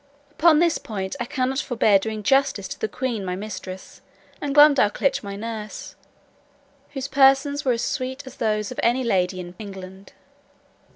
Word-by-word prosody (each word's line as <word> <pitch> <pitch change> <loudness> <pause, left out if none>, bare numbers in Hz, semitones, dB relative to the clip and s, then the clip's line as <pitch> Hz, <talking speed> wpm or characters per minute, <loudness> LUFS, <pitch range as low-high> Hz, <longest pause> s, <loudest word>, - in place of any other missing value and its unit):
Upon 315 +1 +4
this 335 0 +2
point, 190 -2 -5
I 240 - -2
cannot 260 +1 -1
forbear 220 -7 +3
doing 215 +1 -5
justice 270 -5 +2
to - - -7
the - - -1
queen 245 -4 -3
my 180 -1 -3
mistress, 190 -2 -8 0.4
and 285 -1 -3
Glumdalclitch 280 -4 +4
my 200 -1 -6
nurse, 215 0 -7 1.0
whose 270 -2 -4
persons 280 +1 +3
were 255 - +2
as 230 - -2
sweet 260 0 -3
as 260 - -11
those 215 -1 -1
of 255 - -6
any 245 +2 +2
lady 185 -5 0
in 175 -1 -8
England. 190 -2 -10
230 Hz, 160 wpm, -23 LUFS, 200-270 Hz, 1.0 s, Upon